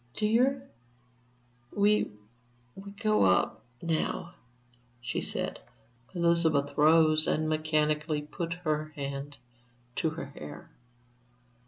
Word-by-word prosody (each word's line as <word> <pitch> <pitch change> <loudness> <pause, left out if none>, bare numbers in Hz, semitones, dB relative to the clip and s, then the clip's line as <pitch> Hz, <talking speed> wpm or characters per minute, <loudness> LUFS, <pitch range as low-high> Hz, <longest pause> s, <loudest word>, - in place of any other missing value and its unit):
"Dear, 250 +6 +2 1.0
we 205 +1 +3 0.6
we 195 +1 -10
go 215 +1 +1
up 95 +3 +2 0.2
now," 165 +1 -1 0.7
she 120 0 -3
said. - - -2 0.6
Elizabeth 170 -4 +2
rose 155 0 +5
and 155 0 +1
mechanically 155 -1 +1
put 165 +3 -4
up - - -15
her 155 -2 0
hand 140 0 -5 0.6
to 160 - +1
her 160 -2 -6
hair. 75 - -10
155 Hz, 100 wpm, -29 LUFS, 150-175 Hz, 1.0 s, rose